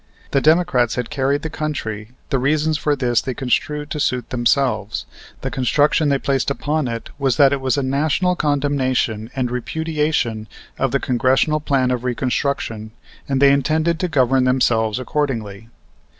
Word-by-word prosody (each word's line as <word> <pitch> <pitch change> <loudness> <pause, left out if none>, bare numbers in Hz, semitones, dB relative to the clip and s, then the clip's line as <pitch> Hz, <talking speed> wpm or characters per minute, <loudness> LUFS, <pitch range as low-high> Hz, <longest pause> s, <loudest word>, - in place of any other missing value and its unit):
The 140 - +2
Democrats 155 -7 +3
had 125 -2 -4
carried 140 +1 0
the 160 - -3
country; 110 -10 -4 0.2
the 135 - +2
reasons 155 +4 +1
for 145 0 0
this 120 -4 +1
they 130 -2 -4
construed 150 +3 -1
to 150 - -3
suit 125 -4 -1
themselves. 120 -3 0 0.4
The - - -3
construction 145 +4 +2
they 140 - +2
placed 135 0 0
upon 145 +1 -1
it 115 -1 -5
was 135 -4 +1
that 140 -1 +5
it 140 - -2
was 130 +2 0
a 140 - 0
national 155 +7 +1
condemnation 135 -7 0
and 125 -2 -1
repudiation 150 -4 -1 0.3
of - - +1
the - - +1
Congressional 130 +5 +1
Plan 135 -4 +1
of 125 -1 -2
Reconstruction, 125 -3 -2 0.4
and 135 -1 +1
they 140 0 +6
intended 155 +4 +1
to 180 - 0
govern 135 -4 +2
themselves 120 -4 +2
accordingly. 115 -6 -3
135 Hz, 160 wpm, -20 LUFS, 125-150 Hz, 0.4 s, they